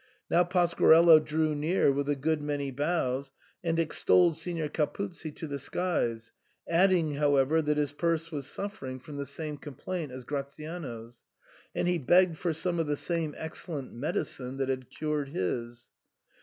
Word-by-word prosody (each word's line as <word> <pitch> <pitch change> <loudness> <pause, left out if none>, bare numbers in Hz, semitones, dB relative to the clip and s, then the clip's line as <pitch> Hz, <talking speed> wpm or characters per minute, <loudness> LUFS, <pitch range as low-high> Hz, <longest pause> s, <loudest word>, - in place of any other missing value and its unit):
Now 175 - +5
Pasquarello 170 -2 +6
drew 155 0 0
near 150 +1 +2
with 140 +1 -1
a 145 - +2
good 155 +2 0
many 145 -2 -2
bows, 140 -2 -1 0.3
and 165 -1 0
extolled 165 +1 +3
Signor 165 -1 -2
Capuzzi 170 +3 -3
to 160 - -6
the 140 -2 -4
skies, 120 -8 -2 0.4
adding, 170 -3 +3
however, 145 +1 +3
that 150 -1 0
his 145 -2 +1
purse 165 +2 -1
was 140 -3 -4
suffering 195 -11 -5
from 145 +3 -9
the 140 -1 -4
same 150 +1 -4
complaint 150 +2 -5
as 130 0 -8
Gratiano's, 140 -4 -6 0.5
and - - 0
he 180 -1 +2
begged 175 +4 +4
for 175 - 0
some 170 +2 -1
of 165 - 0
the 145 - +1
same 165 -2 -2
excellent 160 -3 -6
medicine 135 - -3
that 135 -1 -1
had 130 -2 -3
cured 150 -2 -2
his. 120 +2 -3
150 Hz, 155 wpm, -29 LUFS, 140-170 Hz, 0.5 s, Pasquarello